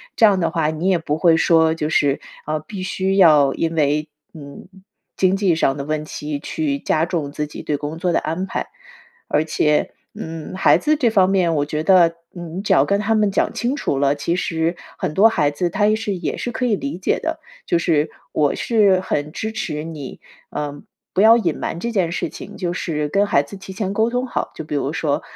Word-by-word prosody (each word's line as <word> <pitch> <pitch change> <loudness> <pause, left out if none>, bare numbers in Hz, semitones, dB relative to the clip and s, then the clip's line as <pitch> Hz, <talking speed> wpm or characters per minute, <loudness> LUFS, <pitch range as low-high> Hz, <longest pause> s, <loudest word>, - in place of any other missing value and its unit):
这 225 - +5
样 200 -3 +4
的 170 - +1
话， 160 -3 0
你 160 +3 -2
也 190 -2 +3
不 155 -2 -2
会 165 0 +4
说， 160 -1 +4
就 155 -2 -2
是， 145 -3 +1 0.2
啊， 155 +1 -1
必 185 +6 -8
须 190 +1 -1
要 150 -7 +6
因 165 0 -2
为， 150 0 +1 0.3
嗯， 140 0 -11 0.5
经 185 0 +3
济 195 -4 +2
上 135 -4 +1
的 140 - -4
问 155 +1 -3
题 150 -1 -5
去 285 - -2
加 155 - +1
重 165 -5 -2
自 150 - -2
己 150 - -9
对 150 - -2
工 145 +2 -5
作 175 +1 0
的 - - +3
安 165 +4 -3
排。 - - -4 0.6
而 150 - +1
且， 150 -1 +1 0.2
嗯， 160 +1 -7
孩 190 - +5
子 305 0 +1
这 255 -6 +2
方 190 -4 +3
面， 185 -4 +2
我 145 -1 +1
觉 150 +1 -3
得 170 -2 +5 0.2
你 175 +1 -7
只 - - +2
要 135 - +5
跟 200 +6 +1
他 210 +2 +1
们 215 -2 +3
讲 - - 0
清 245 +3 -1
楚 145 - -1
了， 140 0 +3
其 170 +4 -1
实 165 -1 -1 0.2
很 180 -5 -3
多 205 +7 +6
孩 145 -9 +1
子 175 +4 -1
他 205 +4 +1
也 215 - +3
是 215 -2 -3
也 180 - -3
是 245 - -3
可 250 +2 -2
以 230 -4 +2
理 280 0 -4
解 185 - 0
的。 325 0 -3 0.3
就 170 - +2
是 160 -2 +1 0.2
我 145 -2 +2
是 205 -5 +3
很 150 -5 -2
支 220 +7 -4
持 220 -10 -3
你， 155 -5 -8 0.3
呃， 145 -1 -5 0.3
不 190 - +2
要 225 +2 +7
隐 170 -9 -1
瞒 165 - -3
这 235 +6 -3
件 185 -7 0
事 - - -2
情， 205 +1 -10
就 175 -3 -2
是 150 -4 -2
跟 200 +6 +2
孩 140 - +3
子 145 - -11
提 195 0 -10
前 195 0 -3
沟 220 +3 +2
通 250 +1 -1
好， - - -3
就 - - -6
比 150 - -7
如 140 0 -1
说， 150 -3 -1
170 Hz, 245 characters per minute, -20 LUFS, 150-200 Hz, 0.6 s, 要